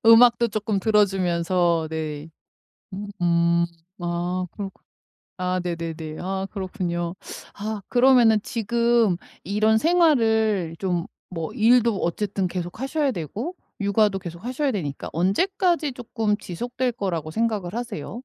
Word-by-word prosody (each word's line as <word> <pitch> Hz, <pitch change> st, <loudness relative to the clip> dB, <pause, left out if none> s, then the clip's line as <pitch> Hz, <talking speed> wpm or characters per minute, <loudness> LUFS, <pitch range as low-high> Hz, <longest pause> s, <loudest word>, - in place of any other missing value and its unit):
음악도 235 Hz, +1 st, +7 dB
쪼끔 210 Hz, -1 st, -1 dB
들어주면서 180 Hz, -5 st, +2 dB
네. 155 Hz, -1 st, -4 dB, 0.6 s
으음. 170 Hz, -4 st, +1 dB, 0.3 s
아 175 Hz, +1 st, -2 dB
그렇구 195 Hz, -2 st, -7 dB, 0.6 s
아 185 Hz, 0 st, 0 dB
네네네. 165 Hz, -2 st, -4 dB
아 190 Hz, +1 st, -2 dB
그렇군요. 180 Hz, -3 st, -3 dB, 0.4 s
아 210 Hz, 0 st, -4 dB
그러면은 245 Hz, -3 st, +5 dB
지금 235 Hz, -3 st, +2 dB, 0.3 s
이런 215 Hz, +3 st, +2 dB
생활을 220 Hz, -, +3 dB
좀 180 Hz, -2 st, -1 dB, 0.3 s
뭐 165 Hz, +4 st, -3 dB
일도 230 Hz, -1 st, +4 dB
어쨌든 195 Hz, +2 st, -1 dB
계속 175 Hz, +3 st, -5 dB
하셔야 280 Hz, +2 st, 0 dB
되고 220 Hz, -, -4 dB, 0.2 s
육아도 200 Hz, -1 st, +2 dB
계속하셔야 245 Hz, -, -3 dB
되니까 150 Hz, -, -4 dB
언제까지 335 Hz, -, +1 dB
쪼끔 225 Hz, -4 st, -1 dB
지속될 245 Hz, +7 st, -3 dB
거라고 170 Hz, -8 st, -3 dB
생각을 215 Hz, -3 st, -1 dB
하세요? 240 Hz, +1 st, -5 dB
200 Hz, 265 characters per minute, -24 LUFS, 175-230 Hz, 0.6 s, 음악도